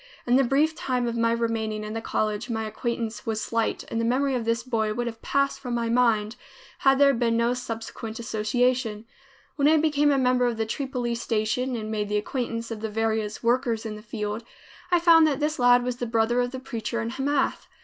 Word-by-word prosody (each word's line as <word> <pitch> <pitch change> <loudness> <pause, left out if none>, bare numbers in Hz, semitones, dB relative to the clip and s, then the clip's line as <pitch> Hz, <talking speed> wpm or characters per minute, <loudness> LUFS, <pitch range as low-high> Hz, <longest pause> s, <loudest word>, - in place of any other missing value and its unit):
In 245 - +3
the 270 - +5
brief 285 +5 +2
time 255 -6 -1
of 235 - -2
my 230 0 +2
remaining 225 -2 -1
in 215 0 -5
the 225 - -3
college, 215 +1 -2
my 220 -1 -2
acquaintance 225 0 -4
was 220 -1 -1
slight 230 +1 -1
and 230 - 0
the - - -1
memory 265 +4 +1
of 240 -3 -1
this 230 0 0
boy 220 -4 -1
would 240 +1 -1
have 225 -1 -6
passed 275 0 0
from 245 -3 -4
my 235 -1 -1
mind, 230 -2 +2 0.4
had 270 0 +4
there 280 0 +5
been 230 -2 +1
no 235 +1 +2
subsequent 225 -2 -6
association. 230 0 0 0.5
When 285 -1 +3
I 315 +1 +5
became 295 -1 +3
a 280 - +3
member 250 -1 +3
of 235 -2 -2
the 225 - 0
Tripoli 250 0 -2
Station 235 +2 -1
and 215 -1 -4
made 210 -1 -2
the 210 - +1
acquaintance 230 +1 -3
of 220 -2 -5
the 220 - -3
various 220 0 -1
workers 235 -1 +1
in 215 -1 -4
the 210 - -10
field, 210 0 -4 0.5
I 350 -1 +4
found 330 -2 +6
that 290 -2 0
this 305 0 -1
lad 245 0 +5
was 250 -1 -2
the 245 - -3
brother 230 +2 +2
of 245 - -1
the 260 +1 -6
preacher 235 -3 -4
in 230 0 -3
Hamath. 275 +3 -1
235 Hz, 220 wpm, -25 LUFS, 225-255 Hz, 0.5 s, found